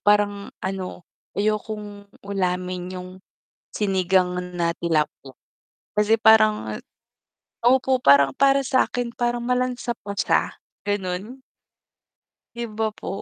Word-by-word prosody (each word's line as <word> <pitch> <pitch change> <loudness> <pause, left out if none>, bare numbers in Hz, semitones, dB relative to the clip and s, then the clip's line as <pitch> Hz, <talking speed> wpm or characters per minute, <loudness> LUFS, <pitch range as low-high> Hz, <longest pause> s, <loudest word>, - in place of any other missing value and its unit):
parang 205 -1 +2 0.2
ano, 190 -2 -4 0.3
ayokong 210 -1 -3 0.2
ulamin 185 -2 -2
yung 180 0 -7 0.6
sinigang 185 -2 +1 0.2
na 170 -1 0
tilapia 155 -5 -1 0.6
kasi 220 +2 +3
parang 215 - +4 0.9
opo, 260 +1 +4
parang 140 -1 +6
para 275 0 +4
sa'kin 245 -2 0
parang 240 0 0
malansa 250 0 0
pa 200 -2 -7
siya, - - +1 0.3
ganun. 205 +4 -3 1.1
'Di 235 0 -4
ba 220 0 -2
po? 210 - -9
205 Hz, 100 wpm, -23 LUFS, 180-235 Hz, 1.1 s, parang